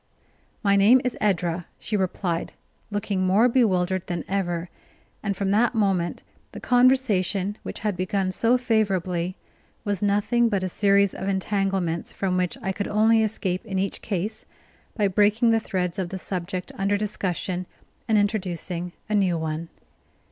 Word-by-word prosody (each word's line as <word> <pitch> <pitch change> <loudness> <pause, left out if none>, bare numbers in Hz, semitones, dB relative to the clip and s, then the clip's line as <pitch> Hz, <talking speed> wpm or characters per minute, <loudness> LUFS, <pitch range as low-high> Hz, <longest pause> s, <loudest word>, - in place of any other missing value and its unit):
"My 200 -1 +4
name 210 +6 +6
is 250 -1 -1
Edra," 175 -4 0
she 215 - -3
replied, 185 -3 -1 0.4
looking 205 -2 -2
more 195 +6 +4
bewildered 190 -7 +1
than 175 -1 -3
ever; 175 -3 -1 0.5
and 200 -2 -2
from 195 -1 0
that 235 +4 +3
moment 190 -5 0 0.3
the - - -7
conversation, 220 -6 +2
which - - -7
had 210 -3 -1
begun 185 +1 -1
so 230 +6 +3
favorably, 190 -7 0 0.5
was 205 -3 -1
nothing 210 +4 +2
but 200 -3 0
a 185 - -1
series 200 +1 +3
of 190 - -5
entanglements, 195 -3 -1
from 190 -2 -1
which 180 -1 -1
I 190 - 0
could 200 +1 -3
only 220 +2 +4
escape 200 -3 -1
in 200 -4 -4
each 195 +1 -2
case 210 +2 -3 0.5
by 205 -2 +3
breaking 210 +4 +3
the 225 - +4
threads 185 -3 -2
of 180 -2 -2
the 190 - -5
subject 185 0 -4
under 200 +1 +2
discussion, 185 -3 -2 0.4
and 220 - +3
introducing 180 -4 -2
a 215 - -3
new 190 -4 +2
one. 160 +1 -3
195 Hz, 155 wpm, -25 LUFS, 180-210 Hz, 0.5 s, name